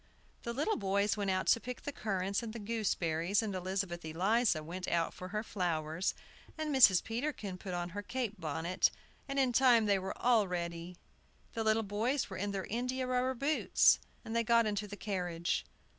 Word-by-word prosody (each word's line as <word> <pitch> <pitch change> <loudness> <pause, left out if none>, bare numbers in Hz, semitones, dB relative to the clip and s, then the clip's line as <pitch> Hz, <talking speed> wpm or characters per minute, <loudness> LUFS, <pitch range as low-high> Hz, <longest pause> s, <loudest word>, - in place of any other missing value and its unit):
The 235 - -4
little 295 - 0
boys 200 +1 +1
went 200 -2 -1
out 185 0 +1
to - - +4
pick 250 +1 -7
the 285 - -3
currants 195 -4 -1
and 225 -2 -6
the 235 - -6
gooseberries, 200 -4 0
and 210 -2 -3
Elizabeth 185 -1 -3
Eliza 180 +2 +1
went 180 +4 -6
out 170 -1 0
for 185 - -8
her 210 +3 -3
flowers, 170 -4 -1 0.4
and 310 -2 -1
Mrs. 205 -9 +7
Peterkin 225 -4 -3
put 185 -2 -5
on 175 0 -3
her 205 +4 -5
cape 230 -1 -3
bonnet, 160 +4 +1 0.4
and 275 0 -4
in 260 -3 +3
time 240 -3 +5
they 200 -2 +3
were 190 +1 -5
all 230 -5 +3
ready. 170 0 -4 0.6
The 225 - -2
little 220 +1 +2
boys 220 +6 -1
were 185 - -5
in 205 +2 -2
their 195 -1 -3
india 250 +3 -2
rubber 255 +1 0
boots, 280 +5 +4 0.3
and 225 - -5
they 230 - +3
got 230 0 +4
into 210 0 -1
the 205 0 -8
carriage. 175 - -2
205 Hz, 190 wpm, -33 LUFS, 180-235 Hz, 0.6 s, Mrs